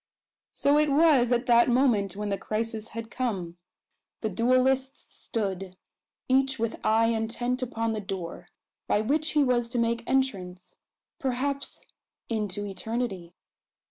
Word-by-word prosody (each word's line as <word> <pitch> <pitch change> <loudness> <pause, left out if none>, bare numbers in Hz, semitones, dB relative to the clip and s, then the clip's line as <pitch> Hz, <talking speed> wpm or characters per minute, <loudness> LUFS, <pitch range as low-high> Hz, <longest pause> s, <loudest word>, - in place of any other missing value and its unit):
So 285 +1 +3
it 300 0 +3
was 280 -5 +4
at 245 +1 +2
that 240 0 +5
moment 235 -7 +2
when 210 0 -3
the 200 - 0
crisis 220 0 -3
had 230 0 -6
come. 190 -9 -3 0.6
The 220 - -1
duellists 255 +4 +1
stood, 195 -4 -4 0.5
each 265 +1 +2
with 230 -1 -3
eye 225 +1 +3
intent 230 +3 -1
upon 230 -2 -1
the 215 -1 -2
door, 190 -3 -6 0.4
by 210 - +2
which 300 +8 0
he 300 -1 +4
was 240 -3 +1
to 245 - -3
make 235 0 +1
entrance 190 -9 -1 0.4
perhaps 275 +2 -2 0.4
into 205 -3 -2
eternity! 195 -4 -4
230 Hz, 135 wpm, -27 LUFS, 210-260 Hz, 0.6 s, that